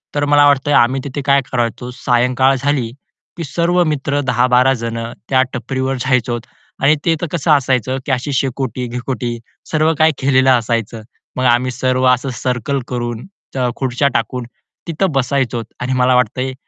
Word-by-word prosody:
तर 145 0 +1
मला 145 0 +5
वाटतंय 145 +1 +2
आम्ही 130 +2 +3
तिथे 140 0 -5
काय 140 0 +3
करायचो 120 -1 -2
सायंकाळ 125 +2 +2
झाली, 135 -3 -1 0.5
की 170 - -4
सर्व 170 +4 +1
मित्र 145 -2 -1
10-12 125 +2 +3
जण 115 -2 -4 0.3
त्या 130 -1 +4
टपरीवर 130 +2 -2
जायचोत 125 -2 0 0.4
आणि 145 +2 +5
ते 165 -2 +3
तर 175 - -1
कसं 165 -2 0
असायचं 130 -3 +2
की - - -2
अशी 130 +3 -1
शेकोटी-बिकोटी 125 -2 -3 0.3
सर्व 155 +1 +2
काही 160 0 +5
केलेलं 130 -1 +3
असायचं. 115 -1 -3 0.4
मग 130 - 0
आम्ही 125 +1 +3
सर्व 130 +1 0
असं 125 +2 -2
सर्कल 125 +2 -1
करून, 120 -2 -4 0.3
च 125 -2 0
खुर्च्या 130 +1 0
टाकून, 125 -2 -2 0.4
तिथं 170 +3 0
बसायचो. 130 -3 -1 0.2
आणि 130 +1 -1
मला 125 0 +3
वाटतंय 125 +2 0
130 Hz, 155 wpm, -17 LUFS, 125-140 Hz, 0.5 s, मला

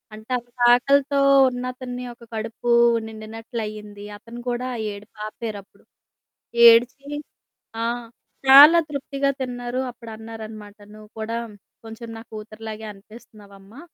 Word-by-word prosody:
అంటే, 220 +4 -13
అంతాకలితో 250 +4 +3 0.3
ఉన్నతన్ని 250 0 -6
ఒక 235 - -19
కడుపూ 230 +2 -3 0.4
నిండినట్లయింది. 215 -2 -7
అతను 235 +3 -11
కూడా 245 +1 -2 0.3
ఏడుపాపారప్పుడు. 210 0 -8 0.9
ఏడ్చి 245 +4 +4 0.8
ఆ! - - 0 0.6
చాలా 290 +5 +10
తృప్తిగా 275 -1 -2
తిన్నారు. 245 -1 -4
అప్పుడన్నారనమాట, 220 -2 -10 0.2
"నువ్వు 215 0 -14
కూడా 225 +1 -3 0.5
కొంచుం 225 +1 -9
నా - - -9
కూతురులాగే 220 0 -8
అనిపిస్తన్నావమ్మా, 205 +1 -16
230 Hz, 90 wpm, -23 LUFS, 215-245 Hz, 0.9 s, చాలా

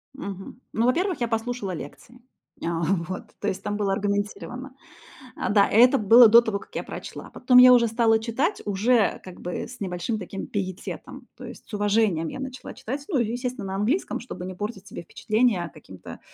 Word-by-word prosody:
Мгм. 200 -1 -8
Ну, 230 +2 +1
во-первых, 355 +7 +1
я 235 - +1
послушала 225 -3 -3
лекции. 180 +9 -9 0.4
А 165 0 -1
вот, 180 +1 -1 0.2
то 205 - -3
есть 190 0 -3
там 205 0 -2
было 200 -2 0
аргументировано. 205 +6 -3 0.7
Да, 205 -1 +4
это 250 +5 +5
было 230 +2 +8
до 230 +2 +9
того, 220 -3 -2
как - - -17
я - - -2
прочла. - - -8
Потом 250 -1 +3
я 250 0 +10
уже 235 -1 +5
стала 225 0 +3
читать, 260 - -1
уже 210 +2 +2
как 185 -1 -11
бы 180 - -4
с 250 - -12
небольшим 185 +4 -3
таким 195 0 -6
пиететом. 185 -3 -6
То - - -10
есть - - -11
с - - -17
уважением 205 -5 +1
я - - -6
начала 260 -1 -7
читать. 265 +3 -6
Ну, 300 - +1
и 230 -1 0
естественно, 245 -4 -4
на 190 - -4
английском, 230 - -1
чтобы 180 -7 -8
не 185 - -6
портить 205 0 -6
себе - - -8
впечатление 215 -1 0
каким-то 95 - -12
220 Hz, 185 wpm, -25 LUFS, 195-245 Hz, 0.7 s, я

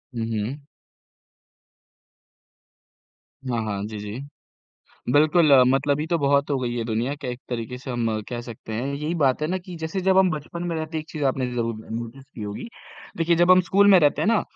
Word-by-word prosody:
हुँ, 115 - -2
हुँ। 115 +7 -3 2.9
हाँ, 120 -2 0
हाँ। 100 -2 -3
जी, 110 - -7
जी। 105 +3 -6 0.9
बिल्कुल, 155 +2 +4 0.2
मतलबी 140 +3 +1
तो 170 +1 +1
बहुत 140 0 +2
हो 140 - +1
गई 120 -1 -2
है 120 - -1
दुनिया। 115 +4 -1
क - - -6
एक 125 -1 -4
तरीके 120 0 -4
से 130 +1 -10
हम 115 -3 -1
कह 120 -1 -4
सकते 115 -2 -9
हैं 120 +4 -2
यही 150 +4 -2
बात 130 +2 +2
है 155 - 0
ना 185 +3 -1
कि 180 - -8
जैसे 160 +4 -3
जब 190 0 +3
हम 190 -1 +5
बचपन 155 +3 -5
में 170 - -2
रहते 160 0 -4
एक 155 - -4
चीज़ 150 -3 -4
आपने 130 -1 0
ज़रूर 115 -1 -1 0.2
नोटिस 120 +4 -6
की - - -7
होगी। 105 - -6 0.5
देखिए 170 0 +2
जब 175 +2 +5
हम 185 0 +7
स्कूल 200 +3 +3
में 185 - +8
रहते 145 -2 +3
हैं - - +1
ना, 225 -2 +3
140 Hz, 200 wpm, -24 LUFS, 120-160 Hz, 2.9 s, में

